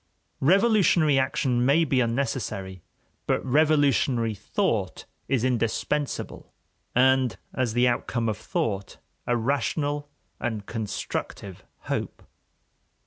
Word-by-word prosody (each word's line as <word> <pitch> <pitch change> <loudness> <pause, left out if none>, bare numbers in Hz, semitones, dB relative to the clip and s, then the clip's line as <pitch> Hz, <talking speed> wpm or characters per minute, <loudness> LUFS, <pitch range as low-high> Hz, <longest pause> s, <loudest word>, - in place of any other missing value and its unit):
Revolutionary 175 - +4
action 130 -2 +1
may 140 +6 +4
be 135 -3 +1
unnecessary, 115 -7 -2 0.5
but - - 0
revolutionary 140 -5 +2
thought 100 - -2 0.2
is 130 -3 +1
indispensable, 130 +4 -2 0.4
and, 130 0 +3 0.2
as 125 -4 -1
the 120 +1 +3
outcome 120 -1 -1
of 110 - 0
thought, 100 -3 -3 0.3
a 120 - +2
rational 145 +4 -1 0.3
and 110 -4 -3
constructive 105 -3 -5 0.2
hope. - - -4
130 Hz, 95 wpm, -26 LUFS, 115-145 Hz, 0.5 s, Revolutionary